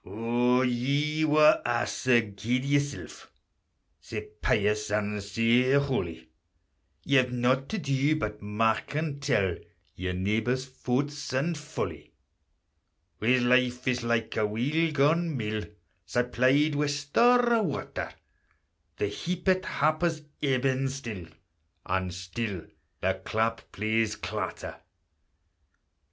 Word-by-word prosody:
O 120 +5 +1
ye 140 +5 0
wha 155 0 +5
are 120 0 +1
sae 125 -2 +2
guid 110 +5 -2
yoursel', 145 0 -2 0.7
Sae 105 +6 -7
pious 105 0 +1
and 105 0 -1
sae 115 +5 +2
holy, 90 - 0 0.8
Ye've 130 -3 +3
nought 125 +2 +1
to 220 - -2
do 140 -2 +1
but 105 -8 -4
mark 105 +5 0
and 150 -2 -2
tell 100 -11 +1 0.4
Your 90 0 -3
neebor's 110 +7 0
fauts 135 +3 -3
and 150 +6 0
folly: 150 0 -6 1.0
Whase 125 +3 +3
life 125 0 +2
is 125 -1 +1
like 115 -1 0
a 110 -1 +2
weel 145 +10 0
gaun 155 +2 +2
mill, 110 -2 -3 0.4
Supplied 130 +5 +2
wi' 145 +1 +1
store 235 +13 +3
o' 230 - +4
water. 165 -9 -3 0.9
The - - 0
heapèt 180 - -1
happer's 155 +1 0 0.2
ebbing 135 -1 +1
still, 115 -10 -6 0.6
And 95 -1 -1
still 95 +1 -5 0.4
the 95 0 0
clap 115 +2 -1
plays 110 0 0
clatter. - - -5
125 Hz, 115 wpm, -28 LUFS, 110-145 Hz, 1.0 s, wha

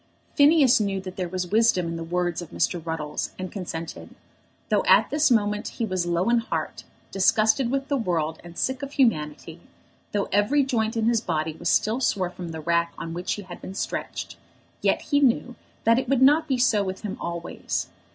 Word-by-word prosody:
Phineas 285 -4 +5
knew 200 -2 -1
that 185 -1 -8
there 180 -2 -3
was 180 -1 -4
wisdom 220 -5 +3
in 165 0 -3
the 165 - -4
words 175 0 -1
of 170 - -9
Mr. 175 -3 -1
Ruddles, 160 -2 -4
and 185 -1 -5
consented. 170 -4 -7 0.5
Though - - +2
at - - +5
this 295 0 +3
moment 210 -3 +1
he 230 - 0
was 185 -4 -2
low 175 +3 0
in 240 - +4
heart, 230 - -4 0.3
disgusted 220 +6 +3
with 270 +1 -1
the 280 - 0
world, 165 - -1
and 170 0 -12
sick 260 0 -1
of 280 0 -6
humanity, 160 - 0 0.5
though 205 -1 -1
every 210 +9 +3
joint 230 -3 -1
in 220 - +1
his 230 -1 +2
body 160 -5 -2
was 160 - -3
still 220 +4 +2
sore 185 -7 0
from 180 -2 -7
the 160 -1 -6
rack 170 +1 +1
on 165 - -6
which 175 +2 -2
he 205 - -6
had 180 -2 -10
been 190 - -8
stretched, - - -4 0.4
yet - - +1
he 285 - +2
knew 250 -2 +2 0.3
that 230 +2 +4
it 260 -2 -4
would 265 -1 +3
not 295 +4 +5
be 265 - +1
so 220 -4 +3
with 190 -1 -5
him 210 -3 -4
always. 170 0 -4
195 Hz, 200 wpm, -25 LUFS, 170-240 Hz, 0.5 s, Phineas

